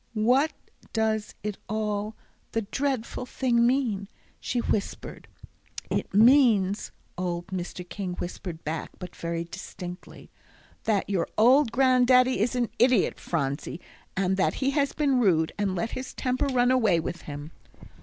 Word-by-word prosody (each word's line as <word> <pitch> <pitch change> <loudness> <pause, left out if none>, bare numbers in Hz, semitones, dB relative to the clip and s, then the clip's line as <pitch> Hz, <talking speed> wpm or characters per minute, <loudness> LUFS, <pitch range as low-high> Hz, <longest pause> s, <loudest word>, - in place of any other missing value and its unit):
"What 255 +8 +3 0.4
does 220 -1 0
it 210 -1 -4
all 210 0 -2 0.4
the 225 - 0
dreadful 255 +1 -2
thing 235 -3 +2
mean?" 235 -7 0 0.3
she 250 - -3
whispered. 215 -3 -2 0.6
"It - - -1
means," 215 -3 +4 0.3
old 175 -1 -2
Mr. 180 -1 -5
King 185 -1 -4
whispered 175 -1 -6
back, 155 +1 -3
but 180 -2 -9
very 170 0 -3
distinctly, 180 0 -9 0.5
"that 210 -3 +1
your 185 -4 0
old 250 +3 +5
Granddaddy 255 -1 +4
is 235 +5 +1
an 245 -2 0
idiot, 245 -3 +3
Phronsie, 140 0 -2 0.4
and 190 0 +1
that 190 - +2
he 270 0 0
has 280 -1 +1
been 280 -4 +1
rude, 165 -8 +3
and 195 -2 0
let 225 +6 -2
his 255 0 -6
temper 255 +2 0
run 250 -2 +3
away 220 -9 +3
with 170 +1 -4
him." 145 +2 -7
215 Hz, 140 wpm, -27 LUFS, 180-250 Hz, 0.6 s, old